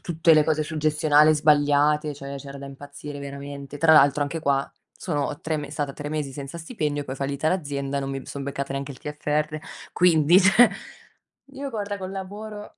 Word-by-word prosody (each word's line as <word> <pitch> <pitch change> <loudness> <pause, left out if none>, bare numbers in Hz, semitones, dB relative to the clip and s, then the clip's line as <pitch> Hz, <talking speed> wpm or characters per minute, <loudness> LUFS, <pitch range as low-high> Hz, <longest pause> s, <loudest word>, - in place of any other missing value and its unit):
tutte 165 -4 +2
le 155 -1 +5
cose 155 -1 +1
sul 155 +1 -5
gestionale 155 0 +4
sbagliate, 150 0 +3
cioè, 140 0 -7
c'era 140 0 -9
da 140 - -9
impazzire 145 +1 -9
veramente. 140 0 -8
Tra 160 +2 +5
l'altro 145 -1 +5
anche 160 +3 -3
qua, 140 -2 0 0.3
sono 145 -4 -2
3 160 -1 -2
me 145 -1 -6
stata 145 -2 -3
3 145 0 -6
mesi 150 -3 -2
senza 140 +4 -7
stipendio 155 -5 -3
e - - -13
poi 130 - -4
è - - -11
fallita 140 +3 -1
l'azienda. 140 -5 -2
Non 135 0 -4
mi 135 -1 -6
son 140 - -6
beccata 140 0 -4
neanche 140 +1 -4
il 125 - -14
TFR 150 +1 -2 0.4
quindi 175 -1 +5
cioè. 205 +5 +6 0.8
Io 275 0 -5
guarda 205 -3 -4
col 185 0 -5
lavoro 205 +2 -8
150 Hz, 195 wpm, -24 LUFS, 140-160 Hz, 0.8 s, cioè